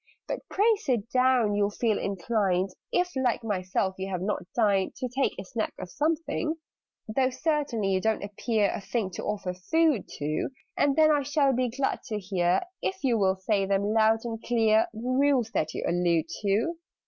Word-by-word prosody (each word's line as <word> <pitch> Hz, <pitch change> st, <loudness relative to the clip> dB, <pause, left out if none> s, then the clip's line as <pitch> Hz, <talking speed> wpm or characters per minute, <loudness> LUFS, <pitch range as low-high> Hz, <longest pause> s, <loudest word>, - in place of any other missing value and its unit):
But -, -, -2 dB
pray 435 Hz, +3 st, +3 dB
sit 240 Hz, -, -2 dB
down: 255 Hz, -4 st, +3 dB
you'll 205 Hz, 0 st, +2 dB
feel 215 Hz, 0 st, 0 dB
inclined 195 Hz, -1 st, 0 dB, 0.2 s
(If, 360 Hz, -2 st, 0 dB
like 250 Hz, -3 st, 0 dB
myself, 190 Hz, -2 st, -1 dB
you 190 Hz, +1 st, -3 dB
have 180 Hz, -2 st, -3 dB
not 190 Hz, -3 st, -3 dB
dined) 200 Hz, -5 st, +2 dB
To 255 Hz, -, -3 dB
take 265 Hz, +3 st, 0 dB
a 190 Hz, -, -6 dB
snack 220 Hz, +3 st, -3 dB
of 180 Hz, -, -7 dB
something: 320 Hz, +1 st, -1 dB, 0.5 s
"Though, 255 Hz, +4 st, +1 dB
certainly, 280 Hz, -7 st, -1 dB
you 190 Hz, 0 st, +1 dB
don't 220 Hz, 0 st, 0 dB
appear 205 Hz, +1 st, 0 dB
A -, -, -4 dB
thing 200 Hz, 0 st, -2 dB
to -, -, -6 dB
offer 200 Hz, -3 st, -2 dB
food 295 Hz, -, +1 dB
to! 150 Hz, +1 st, -2 dB, 0.3 s
And 280 Hz, -1 st, +2 dB
then 310 Hz, -1 st, +5 dB
I 295 Hz, -1 st, +3 dB
shall 280 Hz, 0 st, +2 dB
be 250 Hz, 0 st, +1 dB
glad 270 Hz, +4 st, -1 dB
to 215 Hz, -4 st, -2 dB
hear 185 Hz, -3 st, +1 dB, 0.2 s
If 380 Hz, -3 st, -3 dB
you 240 Hz, -4 st, +2 dB
will 190 Hz, -1 st, +3 dB
say 195 Hz, +1 st, 0 dB
them 200 Hz, +2 st, +1 dB
loud 220 Hz, 0 st, +4 dB
and 225 Hz, -1 st, -4 dB
clear 225 Hz, -2 st, +3 dB
The 220 Hz, -, -9 dB
Rules 255 Hz, -2 st, +2 dB
that 155 Hz, 0 st, -1 dB
you -, -, -3 dB
allude 170 Hz, -2 st, +2 dB, 0.2 s
to." 215 Hz, +12 st, +1 dB
220 Hz, 185 wpm, -27 LUFS, 195-260 Hz, 0.5 s, then